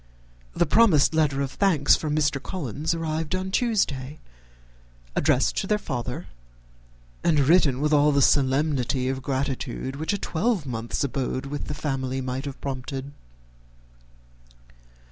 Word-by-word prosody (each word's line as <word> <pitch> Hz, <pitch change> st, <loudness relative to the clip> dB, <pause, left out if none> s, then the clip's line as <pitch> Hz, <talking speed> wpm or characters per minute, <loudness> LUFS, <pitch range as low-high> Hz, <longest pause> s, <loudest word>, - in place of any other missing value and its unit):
The 175 Hz, -, +3 dB
promised 170 Hz, -5 st, +4 dB
letter 150 Hz, -3 st, +2 dB
of 135 Hz, -, -4 dB
thanks 165 Hz, -8 st, +3 dB
from 150 Hz, -1 st, -2 dB
Mr. 145 Hz, -2 st, +1 dB
Collins 155 Hz, -, -3 dB
arrived 160 Hz, +1 st, -2 dB
on 185 Hz, +1 st, -3 dB
Tuesday, 155 Hz, -, 0 dB, 1.0 s
addressed 145 Hz, -3 st, +2 dB
to 195 Hz, -, -1 dB
their 210 Hz, -, +2 dB
father, 130 Hz, -, -4 dB, 1.0 s
and 160 Hz, -3 st, +3 dB
written 140 Hz, -3 st, +4 dB
with 150 Hz, +1 st, +1 dB
all 150 Hz, 0 st, +5 dB
the 140 Hz, -1 st, +3 dB
solemnity 135 Hz, -2 st, +2 dB
of 135 Hz, 0 st, -3 dB
gratitude 135 Hz, -1 st, -3 dB
which 160 Hz, +5 st, -2 dB
a 205 Hz, -, 0 dB
twelve 190 Hz, -, -1 dB
month's 115 Hz, -1 st, -3 dB
abode 135 Hz, -1 st, -2 dB
in 145 Hz, -, -4 dB
the 150 Hz, -, -5 dB
family 135 Hz, -3 st, -2 dB
might 130 Hz, +1 st, -4 dB
have 140 Hz, -1 st, -6 dB
prompted. 135 Hz, 0 st, -5 dB
145 Hz, 135 wpm, -25 LUFS, 130-160 Hz, 1.0 s, all